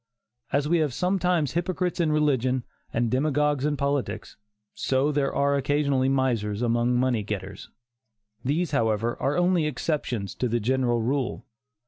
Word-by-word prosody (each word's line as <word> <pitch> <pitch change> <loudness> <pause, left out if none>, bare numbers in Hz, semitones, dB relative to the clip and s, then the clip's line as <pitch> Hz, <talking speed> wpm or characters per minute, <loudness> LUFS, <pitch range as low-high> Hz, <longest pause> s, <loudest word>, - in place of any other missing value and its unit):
As 140 +1 +1
we 170 +2 +3
have 150 -6 0
sometimes 180 -5 +1
hypocrites 180 +1 -1
in 165 -3 +2
religion, 130 -4 +1 0.3
and 115 -1 0
demagogues 145 +1 +1
in 150 -1 0
politics, 140 0 -2 0.4
so 135 +3 +1
there 140 -2 0
are 140 0 +1
occasionally 140 -1 +1
misers 120 -5 0
among 120 +1 +2
money 125 -2 +1
getters. 100 -2 -6 0.7
These, 155 +6 0
however, 115 -3 +1
are 140 +4 +1
only 175 -3 +2
exceptions 125 - -2
to 125 - 0
the 120 +1 0
general 120 0 +1
rule. 130 +1 -1
135 Hz, 140 wpm, -26 LUFS, 120-150 Hz, 0.7 s, we